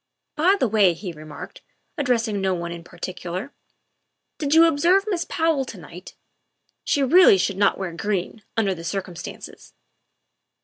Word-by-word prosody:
" - - -57
By 355 +6 +4
the 255 - +2
way," 200 -5 +3
he 180 +2 -6
remarked, 155 -2 -10 0.3
addressing 230 -7 0
no 190 -1 +1
one 170 -1 -5
in 170 0 -8
particular, 185 +8 -6 0.4
" - - -54
did 295 0 +1
you 330 +1 +8
observe 340 +5 +3
Miss 350 -5 -1
Powell 320 -4 +1
to 230 - -9
night? 180 +1 -12 0.7
She 285 - +1
really 320 - +7
should 195 +1 0
not 200 0 +3
wear 190 -3 -4
green, 200 +4 -3 0.2
under 200 -4 +2
the 165 -2 -9
circumstances. 180 -1 -7
205 Hz, 160 wpm, -23 LUFS, 180-285 Hz, 0.7 s, you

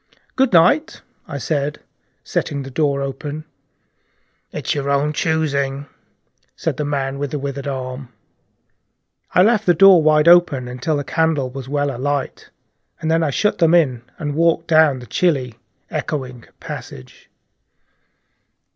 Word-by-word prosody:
"Good 265 -1 +2
night," 200 - +3 0.2
I 145 - -5
said, 145 +1 -2 0.4
setting 140 -1 -3
the 135 - -9
door 140 -1 0
open. 145 +3 -6 1.1
"It's - - -3
your 140 -1 -3
own 140 +2 +1
choosing," 140 -3 -1 0.7
said - - -3
the 150 - -2
man 140 -1 -2
with 145 0 -2
the 150 - -3
withered 140 0 -5
arm. 130 -1 -5 1.2
I 180 - +6
left 215 -1 +2
the 175 - +5
door 195 0 +7
wide 155 0 +3
open 170 -7 +5
until 125 +5 -2
the 145 - -2
candle 155 -4 0
was 135 0 -8
well 145 -2 -1
alight, 140 +2 -3 0.5
and 160 0 -2
then 165 0 +2
I 160 - +1
shut 210 +9 0
them 165 -1 +4
in, 130 -8 +2 0.2
and 145 -3 -3
walked 165 +2 +2
down 155 -4 +4
the 125 - -10
chilly, 130 - 0 0.4
echoing 130 -6 -4
passage. 65 0 -10
145 Hz, 140 wpm, -19 LUFS, 135-160 Hz, 1.2 s, door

